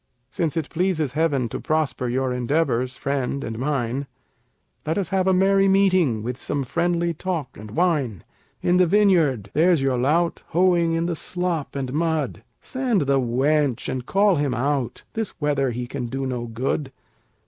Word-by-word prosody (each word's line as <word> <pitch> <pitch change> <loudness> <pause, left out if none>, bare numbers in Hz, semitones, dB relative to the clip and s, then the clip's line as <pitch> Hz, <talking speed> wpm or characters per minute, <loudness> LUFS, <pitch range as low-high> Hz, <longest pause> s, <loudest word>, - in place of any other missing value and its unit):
Since 165 -1 -1
it 155 -3 -3
pleases 165 -5 0
heaven 145 -4 +1
to - - -5
prosper 155 -5 -1
your 130 +1 0
endeavors, 125 -1 0
friend, 140 0 -2
and 110 0 -5
mine, 135 -1 -1 0.8
Let 160 +4 -1
us 195 -5 -1
have 190 -1 +1
a - - +5
merry 195 +1 +4
meeting, 185 - +3
with 125 +1 -3
some 145 -2 -2
friendly 170 +5 0
talk 165 -5 -4
and 105 0 -10
wine. 140 - 0 0.4
In 175 +1 +3
the 180 -1 +4
vineyard 165 - +3
there's 165 -1 +3
your 130 -2 +1
lout, 165 +7 +1
hoeing 170 -1 +2
in 165 +1 0
the 170 -1 -1
slop 175 -2 -3
and 135 -2 -3
mud 160 -3 -1 0.2
Send 255 -7 -1
the 140 -1 +2
wench 135 +2 +1
and 130 -1 -3
call 195 +5 +3
him 145 -3 0
out, 130 -1 -1
this 225 -3 -4
weather 145 -3 +1
he 120 +1 -3
can 125 0 -4
do 135 +3 -3
no 125 -2 -3
good. 130 +4 -2
145 Hz, 170 wpm, -23 LUFS, 130-175 Hz, 0.8 s, a